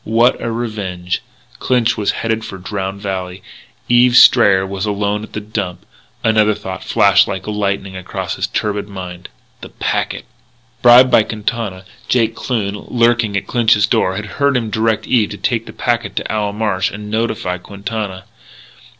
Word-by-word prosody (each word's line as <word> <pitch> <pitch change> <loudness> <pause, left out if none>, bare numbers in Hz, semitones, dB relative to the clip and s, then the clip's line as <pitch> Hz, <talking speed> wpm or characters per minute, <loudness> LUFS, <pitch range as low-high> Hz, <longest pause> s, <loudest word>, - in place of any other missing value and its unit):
What 115 +3 +2
a 115 - -2
revenge!... 100 -6 -3 0.4
Clinch 125 -2 +1
was 105 -2 -1
headed 115 0 -1
for 95 - -7
Drowned 95 +1 -5
Valley. 95 -2 -4 0.4
Eve 120 0 +4
Strayer 100 -6 +6
was 95 +2 -4
alone 105 0 -1
at 110 - -10
the - - -3
Dump.... 100 -4 -5 0.4
Another 110 -2 +3
thought 95 -2 -7
flashed 100 -1 +4
like 95 -1 -4
lightning 100 -2 -2
across 90 -1 -4
his - - -2
turbid 105 -1 -2
mind; 90 -2 -8 0.3
the - - -9
packet! - - -2 0.6
Bribed 125 +1 +7
by - - +6
Quintana, 105 -3 -4 0.2
Jake 115 -3 +2
Kloon, 105 -6 -2
lurking 115 -3 +2
at - - -3
Clinch's 110 -4 +3
door, 95 - +1
had 105 +2 -4 0.2
heard 140 -2 +3
him 115 -3 -3
direct 110 0 0
Eve 115 -5 +2
to - - -7
take - - -1
a - - -6
packet - - -2
to - - -3
Owl 105 -1 -1
Marsh, 105 -3 0
and 105 +1 -8
had 105 - -8
notified 105 -5 -2
Quintana. 100 -1 -5
105 Hz, 165 wpm, -17 LUFS, 95-115 Hz, 0.6 s, Bribed